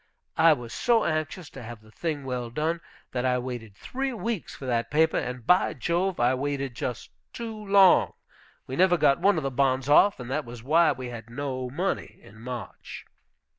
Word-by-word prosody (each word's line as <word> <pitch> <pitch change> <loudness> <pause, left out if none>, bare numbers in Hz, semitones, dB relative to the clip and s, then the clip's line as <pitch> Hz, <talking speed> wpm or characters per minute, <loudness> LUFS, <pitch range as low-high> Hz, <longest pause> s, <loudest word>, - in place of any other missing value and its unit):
I 165 0 +7
was 120 -5 -7
so 235 -3 +2
anxious 155 +1 -2
to - - -10
have 115 -1 -9
the 110 0 -19
thing 150 0 -3
well 125 -2 -3
done, 160 +7 -1 0.3
that 125 - -2
I 125 -1 +2
waited 120 -5 -6
three 265 - -3
weeks 230 -4 -4
for 135 - -9
that 120 -2 0
paper, 160 +2 +3
and, 125 -2 -5
by 180 +5 +3
Jove, 180 +2 -1
I 120 +2 +3
waited 140 -1 -2
just 120 +1 -5 0.2
too 230 -2 -5
long. 200 -3 +5 0.5
We 130 - -5
never 180 +1 +4
got 145 -3 +3
one 195 +1 +3
of 155 - -1
the 135 - -1
bonds 130 0 +1
off, 195 +6 +5
and 125 0 -7
that 150 +3 -1
was 120 -2 -10
why 160 +4 +4
we 125 -2 -5
had 115 -1 -9
no 130 0 -4
money 175 +9 -3
in 110 +2 -15
March." 125 0 -7
140 Hz, 195 wpm, -26 LUFS, 125-170 Hz, 0.5 s, I